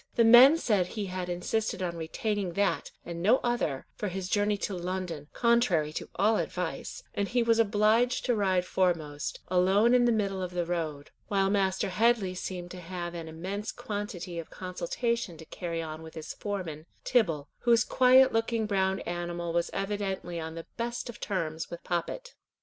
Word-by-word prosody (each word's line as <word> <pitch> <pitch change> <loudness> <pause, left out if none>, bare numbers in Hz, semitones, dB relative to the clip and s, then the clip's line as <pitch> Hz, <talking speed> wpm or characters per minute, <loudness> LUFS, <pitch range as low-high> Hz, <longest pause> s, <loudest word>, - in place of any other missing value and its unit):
The 235 - +5
men 245 +7 +9
said 205 - +1
he 210 +1 -4
had 185 -1 -4
insisted 185 +3 -1
on 170 -1 -2
retaining 185 +3 -2
that, 170 -6 0 0.2
and 170 -1 -5
no 220 +8 +5
other, 235 - -1
for 210 - -4
his 185 0 -4
journey 205 +1 +2
to 200 - -3
London, 175 -4 -4
contrary 235 -11 +2
to - - -5
all 215 +2 +3
advice, 180 -2 -4
and 200 - -1
he 240 +2 +1
was 230 0 +3
obliged 225 +3 +3
to 245 - +2
ride 190 -4 +1
foremost, 160 -6 -1
alone 190 +6 +4
in 245 -1 +5
the 240 - +4
middle 200 -4 0
of 180 -1 -5
the 175 -1 0
road; 160 -4 -3 0.2
while 195 -1 +2
Master 190 -2 +1
Headley 215 -1 +2
seemed 180 -1 -5
to 180 - -8
have 175 0 -5
an 165 -2 -6
immense 190 +6 -4
quantity 205 -7 -5
of 165 - -7
consultation 185 +2 -3
to 160 - -11
carry 165 0 -4
on 155 0 -6
with 160 0 -11
his 160 -1 -6
foreman, 175 -6 -5 0.2
Tibble, 165 - +1
whose 235 -1 +4
quiet 260 +1 +5
looking 225 0 +1
brown 190 -2 +1
animal 175 -1 -3
was 170 0 +1
evidently 195 -4 -3
on 160 0 -5
the 165 - -7
best 235 +1 -3
of - - -15
terms 160 -5 -3
with 170 - -8
Poppet. 345 - -3
190 Hz, 180 wpm, -29 LUFS, 170-220 Hz, 0.2 s, men